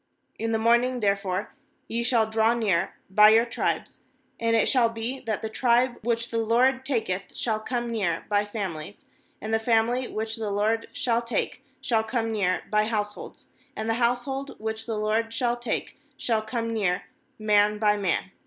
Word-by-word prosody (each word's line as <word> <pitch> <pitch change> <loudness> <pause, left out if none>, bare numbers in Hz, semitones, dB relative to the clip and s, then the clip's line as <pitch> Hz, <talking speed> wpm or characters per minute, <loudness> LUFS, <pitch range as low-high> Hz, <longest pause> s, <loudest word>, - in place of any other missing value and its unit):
MIn 225 0 -1
the 225 - +2
morning 240 +3 +3
therefore 200 -2 -1 0.3
ye 230 +1 -1
shall 235 -2 +3
draw 220 +1 +2
near 195 -6 0 0.2
by 210 +2 +8
your 225 +2 +5
tribes; 235 - -2 0.4
and 230 0 +2
it 225 - +3
shall 245 -4 +4
be, 230 +4 -4
that 225 -4 -3
the - - -1
tribe 240 +2 +2
which 230 +1 -1
the 230 - 0
LORD 250 +4 +3
taketh 220 -8 -2
shall 220 -2 -1
come 240 +1 -3
near 195 -8 -1
by 205 0 +2
families; 200 -4 -6 0.3
and 220 +1 -4
the 225 - +3
family 235 +2 +2
which 220 +1 -4
the 220 -2 -3
LORD 215 +3 0
shall 245 -5 0
take 235 +2 -2 0.2
shall 225 -2 +1
come 225 0 -1
near 200 -4 0
by 210 0 +3
households; 210 -2 -4 0.3
and 220 - -4
the 225 - +2
household 265 +3 -1
which 220 +1 -4
the 225 -2 -2
LORD 220 +2 0
shall 240 +1 0
take 240 +3 -4 0.2
shall 225 -4 0
come 230 +1 -3
near 190 -5 0 0.4
rr\fl,n 210 0 +3
by 210 -1 +3
man. 195 -1 -1
225 Hz, 175 wpm, -26 LUFS, 210-235 Hz, 0.4 s, by